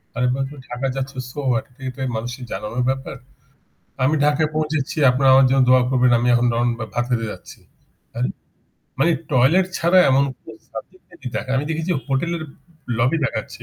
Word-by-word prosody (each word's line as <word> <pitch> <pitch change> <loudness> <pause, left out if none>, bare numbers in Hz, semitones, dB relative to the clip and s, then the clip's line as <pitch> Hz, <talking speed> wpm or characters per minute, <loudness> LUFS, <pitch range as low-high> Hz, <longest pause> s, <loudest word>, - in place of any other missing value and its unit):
আরে 125 +1 +1
বাবা 135 +1 -1
তুমি 145 -2 -11
ঢাকা 125 +2 -3
যাচ্ছ 135 0 -3 0.2
সো 140 - -8
হোয়াট? 115 -3 0 0.2
এটা 130 +1 -9 0.2
মানুষের 120 +3 -5
জানানোর 105 +5 -3
ব্যাপার? 135 +1 -3 0.9
আমি 145 +4 +3
ঢাকায় 150 +1 +2
পৌঁছেছি। 155 -3 -1
আপনারা 130 +1 +3
আমার 135 0 +6
জন্য 135 0 +4
দোয়া 130 0 +6
করবেন। 125 -1 +3
আমি 120 +1 0
এখন 120 +1 +3
রন 120 +1 +1 0.3
ভাত 120 - +1
খেতে 115 -2 0
যাচ্ছি। - - -13 0.6
আরে! 125 +2 0 0.7
মানে 160 +6 +3 0.2
টয়লেট 145 +9 +4
ছাড়া 170 +2 +4
এমন 135 +1 +4 0.2
কোন - - -12 0.2
সাবজেক্ট 185 +7 -10
নাই 175 - -15
যে 130 - -4
দেখায়। 130 - -2
আমি 140 - -2
দেখেছি 160 +2 -2 0.2
হোটেলের 160 +5 -1 0.6
লবি 125 +7 +2
দেখাচ্ছে। 110 -6 -4
135 Hz, 175 wpm, -21 LUFS, 125-150 Hz, 0.9 s, আমার